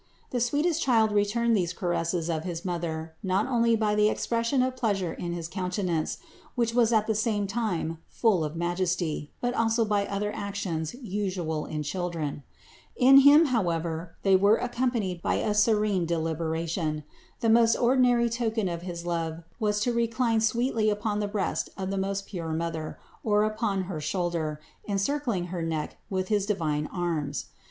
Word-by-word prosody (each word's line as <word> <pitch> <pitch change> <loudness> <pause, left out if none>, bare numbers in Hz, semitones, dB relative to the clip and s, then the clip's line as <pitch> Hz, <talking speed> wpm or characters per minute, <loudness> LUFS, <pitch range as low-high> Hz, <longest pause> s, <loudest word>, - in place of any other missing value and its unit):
The 245 - 0
sweetest 295 +7 +1
Child 225 -4 +3
returned 220 +3 +2
these 180 -3 0
caresses 175 -3 -1
of 160 -2 -1
his 170 -1 -5
Mother 165 -2 -3
not 190 +2 +1
only 235 -3 +3
by 215 -1 +1
the 210 0 +4
expression 230 +4 0
of 255 0 -1
pleasure 200 -8 -1
in 175 - -5
his 170 -2 -4
countenance, 180 -3 -2 0.4
which 235 -2 +1
was 235 -1 +4
at 215 -2 +3
the 220 - +1
same 210 -1 0
time 195 -7 -2
full 210 -8 +2
of 150 +1 -4
majesty, 175 -3 -1
but 245 0 0
also 225 -1 +2
by 205 -1 +1
other 205 +1 -2
actions 195 -4 -3
usual 185 - -3
in 150 -1 -3
children. 165 -3 -3 0.5
In 270 +2 +8
Him, 290 +4 +8
however, 170 -5 -1
they 195 -1 +5
were 200 +3 +5
accompanied 240 -7 -1
by - - +1
a 210 - 0
serene 210 -4 +2
deliberation. 160 -1 -2 0.4
The 230 - +2
most 230 0 +5
ordinary 245 -1 +3
token 225 -3 -1
of 170 -1 -3
his 175 -1 -6
love 165 -1 -2 0.2
was 210 -2 +1
to 240 +3 +1
recline 230 -1 +1
sweetly 225 0 +1
upon 210 0 -1
the 205 - -1
breast 205 -2 -2
of 190 -1 -3
the 195 - -2
most 195 +1 -2
pure 165 -5 -4
Mother, 160 -1 -3 0.3
or 210 -1 +3
upon 215 -3 0
her 175 -4 -5
shoulder, 160 -2 -2 0.3
encircling 205 -1 0
her 175 - -2
neck 160 -2 -3
with 185 -1 -2
his 205 -2 +1
divine 155 -7 0
arms. 160 -6 -3
195 Hz, 165 wpm, -27 LUFS, 170-225 Hz, 0.5 s, In